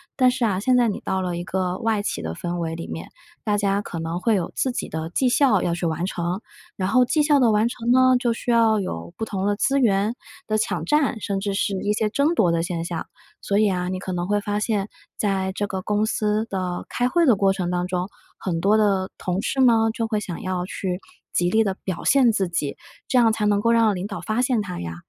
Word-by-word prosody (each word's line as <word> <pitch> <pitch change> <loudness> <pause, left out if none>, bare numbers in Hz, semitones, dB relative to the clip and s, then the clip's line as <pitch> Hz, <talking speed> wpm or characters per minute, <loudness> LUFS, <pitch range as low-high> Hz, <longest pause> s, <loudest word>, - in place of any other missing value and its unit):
但 255 -2 +4
是 250 -1 0
啊， 190 -3 0
现 250 +4 +3
在 240 -1 +4
你 205 - -2
到 190 0 -2
了 175 -2 -2
一 175 - -4
个 185 0 -2
外 220 -2 0
企 - - -3
的 80 0 -4
氛 175 - -4
围 165 -1 -3
里 165 - -6
面， 80 +1 -7 0.3
大 205 -1 +1
家 200 0 +1
可 170 -4 -6
能 165 +2 -3
会 225 +3 +2
有 180 -4 -2
自 260 - 0
己 - - -4
的 160 +1 -4
绩 255 +8 +1
效 245 -6 +3
要 170 - 0
去 170 0 -1
完 165 +2 -1
成。 180 +1 -3 0.3
然 185 -2 -1
后 250 +3 +5
绩 300 +4 +2
效 290 -2 +4
的 240 -3 +4
完 215 +2 +3
成 235 0 -2
呢， 255 0 +5
就 240 -2 +1
需 240 +1 -2
要 225 -2 +4
有 85 - -5
不 225 - -2
同 195 -2 -2
的 205 - +1
资 275 +6 +1
源 210 -2 +2 0.3
的 215 - 0
抢 - - -1
占， 295 -6 +1
甚 195 -1 -2
至 200 0 -2
是 195 -1 0
一 210 - +1
些 215 0 0
争 295 +6 +2
夺 175 - +3
的 165 0 +1
现 170 -1 -3
象。 170 -1 -4 0.3
所 200 - 0
以 215 0 +4
啊， 180 0 -2
你 185 - -2
可 185 - -5
能 175 0 -2
会 205 0 +1
发 205 0 -2
现， 210 -2 -1 0.3
在 190 -2 0
这 205 - -1
个 190 -2 -4
公 210 +1 +1
司 215 0 0
的 185 -2 -3
开 245 0 0
会 340 +6 +2
的 240 - +6
过 195 0 +2
程 185 -3 -2
当 180 0 -1
中， 180 +1 -2 0.3
很 170 -3 -2
多 200 +5 +3
的 200 -3 +2
同 180 +1 -2
事 270 - -2
呢， 225 -3 +5
就 230 -1 -2
会 215 -2 0
想 180 -5 -6
要 185 -1 -2
去 185 -1 -3 0.3
极 175 0 +1
力 225 0 +4
地 195 -3 -1
表 185 -3 -4
现 260 -4 +5
自 195 -4 0
己， 160 -5 -2 0.3
这 255 - +3
样 230 -2 +5
才 215 -1 -1
能 205 0 +2
够 230 - +3
让 225 -3 +4
领 185 +3 -4
导 210 - -6
发 220 +3 -1
现 250 -4 +1
他 180 -3 -6
呀。 85 -1 -5
205 Hz, 275 characters per minute, -23 LUFS, 180-225 Hz, 0.3 s, 的